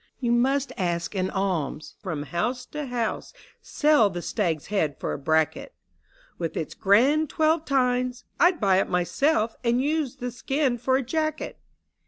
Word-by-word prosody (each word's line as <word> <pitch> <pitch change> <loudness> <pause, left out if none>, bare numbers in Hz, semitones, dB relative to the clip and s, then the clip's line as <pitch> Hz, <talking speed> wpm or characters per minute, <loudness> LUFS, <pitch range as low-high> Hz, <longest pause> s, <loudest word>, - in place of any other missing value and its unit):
" - - -47
You 240 -3 0
must 265 +2 +1
ask 170 -1 -1
an 185 -2 -1
alms 180 -7 -2
from 165 -8 -4
house 240 - -2
to 300 0 -6
house: 240 -3 -3 0.3
Sell 295 -8 +3
the 175 -2 -6
stag's 170 -9 -1
head 155 -8 0
for - - -2
a - - -5
bracket, 160 +2 0 0.6
With 165 -2 -3
its 155 - -3
grand 260 +10 +3
twelve 315 +1 +1
tines 250 -2 0
— - - -43
I'd 350 0 +4
buy 195 -3 +3
it 195 - +1
myself 220 - +1
— - - -38
And 240 +1 +2
use 295 -1 0
the 245 0 -5
skin 260 +1 -1
for 260 +2 +1
a 270 - -1
jacket 310 +4 -2
240 Hz, 175 wpm, -25 LUFS, 185-275 Hz, 0.6 s, I'd